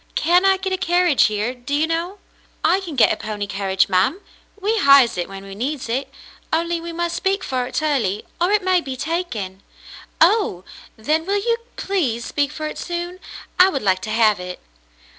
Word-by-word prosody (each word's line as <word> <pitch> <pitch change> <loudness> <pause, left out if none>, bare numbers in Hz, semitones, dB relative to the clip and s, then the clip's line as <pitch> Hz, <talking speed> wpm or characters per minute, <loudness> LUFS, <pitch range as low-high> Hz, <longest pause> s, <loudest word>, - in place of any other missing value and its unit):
"Can 355 +4 +3
I 385 0 +4
get 380 0 -3
a - - 0
carriage 350 -5 +3
here, 215 +3 -1
do 250 +3 -4
you 300 +2 +2
know.'^" 335 +4 -2 0.5
"I 375 - +3
can 345 -6 -7
get 245 - +5
a - - -2
pony 210 -1 -4
carriage, 195 -1 0
ma'm. 195 - +1 0.4
We 425 +3 0
hires 275 - +6
it 175 0 -3
when 195 0 -9
we 195 0 -9
need 260 +6 -3
it, 260 +4 -2 0.4
only 335 +1 0
we 340 0 -6
must 345 0 -2
speak 385 +2 0
for 255 -1 -2
it 310 - -3
early, 240 -10 0 0.2
or 350 - +3
it 420 -1 +2
may 370 -1 +3
be 270 -4 -5
taken." 250 - -3 0.3
" - - -17
Oh! 350 - +3 0.3
Then 310 +9 0
will 400 +1 +1
you 465 +3 +1 0.2
please 265 - -1
speak 285 -1 -1
for 310 0 -5
it 305 - -5
soon? 350 +1 -5 0.4
I 370 +1 +8
would 275 - -3
like 185 -2 +2
to - - -6
have 215 -3 +3
it." 180 0 -7
300 Hz, 200 wpm, -21 LUFS, 220-360 Hz, 0.5 s, I